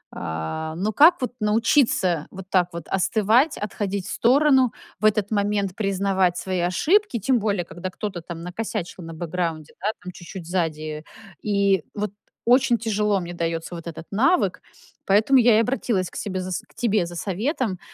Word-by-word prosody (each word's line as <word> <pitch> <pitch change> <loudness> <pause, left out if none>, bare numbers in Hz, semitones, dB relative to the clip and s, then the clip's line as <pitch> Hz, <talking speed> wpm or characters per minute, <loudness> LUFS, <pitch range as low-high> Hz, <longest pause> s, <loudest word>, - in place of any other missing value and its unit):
Э, 80 - -4
но 195 +6 -1
как 315 - +6
вот 250 - -1
научиться 210 - +2
вот 190 -1 -9
так 180 -2 +3
вот 170 - -5
остывать, 220 - +2
отходить 200 -2 -3
в - - -5
сторону, 265 0 +4 0.3
в 215 - -1
этот 210 -1 +2
момент 205 -2 0
признавать 195 -3 +1
свои 185 -1 -2
ошибки, 305 - +2
тем 245 +4 +2
более, 200 -4 -1
когда 175 +2 -6
кто-то 185 -1 -5
там 165 0 -8
накосячил 185 -1 -5
на 165 0 -8
бэкграунде, 165 -2 -3
да, 205 - -1 0.2
там 180 - -6
чуть-чуть 175 0 -9
сзади, 155 -3 -2 0.4
и 200 -4 +2
вот 210 -1 -2 0.3
очень 245 0 +4
тяжело 210 -2 0
мне 175 0 -6
даётся 165 0 -3
вот 170 -1 -7
этот 165 0 -7
навык, 270 - +2 0.4
поэтому 215 +7 +4
я 235 -2 +5
и - - +5
обратилась 230 -6 0
к - - -16
себе 190 -3 -3 0.3
к - - -25
тебе 215 -6 +1
за 175 - -9
советом. 205 - -2
195 Hz, 165 wpm, -23 LUFS, 175-225 Hz, 0.4 s, как